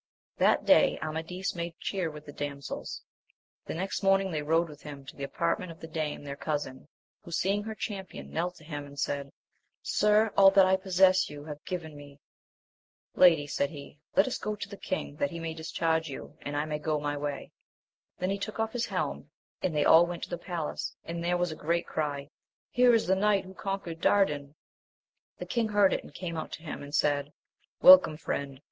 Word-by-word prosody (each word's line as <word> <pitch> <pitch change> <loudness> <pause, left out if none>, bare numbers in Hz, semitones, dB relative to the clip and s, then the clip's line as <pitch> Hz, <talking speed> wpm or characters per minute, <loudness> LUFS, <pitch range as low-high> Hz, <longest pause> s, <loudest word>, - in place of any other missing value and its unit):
HAT - - +3
day - - +5
Amadis 165 +4 -3
made 170 -1 -5
cheer 185 -4 -2
with 150 -1 -10
the 145 - -9
dam* 145 -1 -4
sels; 140 - -6 0.6
the - - -4
next 190 +4 -3
morning 195 -1 +3
they 155 -2 -1
rode 165 +3 +2
with 150 -2 -12
him 140 -2 -9
to - - -10
the 140 - -7
apartment 170 +5 -1
of 165 - -13
the - - -8
dame 155 -2 -3
their 140 -1 -5
cousin, 145 -3 -4 0.4
who - - -11
seeing 195 +4 +1
her 220 +1 -6
champion, 195 -3 -6
knelt 175 +2 -2
to - - -16
him 150 -2 -5
and 140 0 -13
said, 140 -1 -2 0.5
Sir, 210 +1 +3
all 195 -1 +8
that 195 0 +6
I 190 0 +4
possess 190 0 +3
you 145 -1 -9
have 150 -1 -8
given 160 -4 -5
me! 145 -1 -13 0.9
Lady, 165 -5 +6
said 140 -1 -1
he, 145 -1 -11 0.2
let 195 - +6
us - - -2
go 215 0 -2
to 205 0 -6
the 200 - -9
king 185 -7 -4
that 140 - 0
he 170 - -6
may 165 -1 -4
discharge 160 0 -1
you, 140 +2 -8
and 145 0 -4
I 145 - 0
may 150 -1 -3
go 150 0 -1
my 145 0 -2
way. 145 -1 -4 0.7
Then 185 +1 -1
he 200 - -2
took 215 +2 -5
off 225 0 -1
his 245 -1 -1
helm, - - -3 0.3
and 175 -4 -1
they 150 - +2
all 170 +2 +7
went 175 -1 -5
to - - -6
the 175 - -2
palace, 170 -5 -4
and 170 0 -5
there 175 +1 +1
was 175 -1 0
a - - -5
great 170 +3 -1
cry, 145 -2 -3 0.4
Here 245 -1 +5
is 225 - +2
the 190 - +3
knight 200 0 +2
who 190 - -11
conquered 190 -4 -4
Dardan! 150 -8 +2 0.8
The - - -6
king 230 -2 0
heard 205 -2 +4
it - - -2
and - - -13
came 170 +1 -5
out 155 - -5
to 160 - -7
him, 160 - -6
and 145 +1 -5
said, 145 -1 +1 0.5
Welcome, 185 -4 +9
friend 140 -3 -4
165 Hz, 210 wpm, -29 LUFS, 145-190 Hz, 0.9 s, Welcome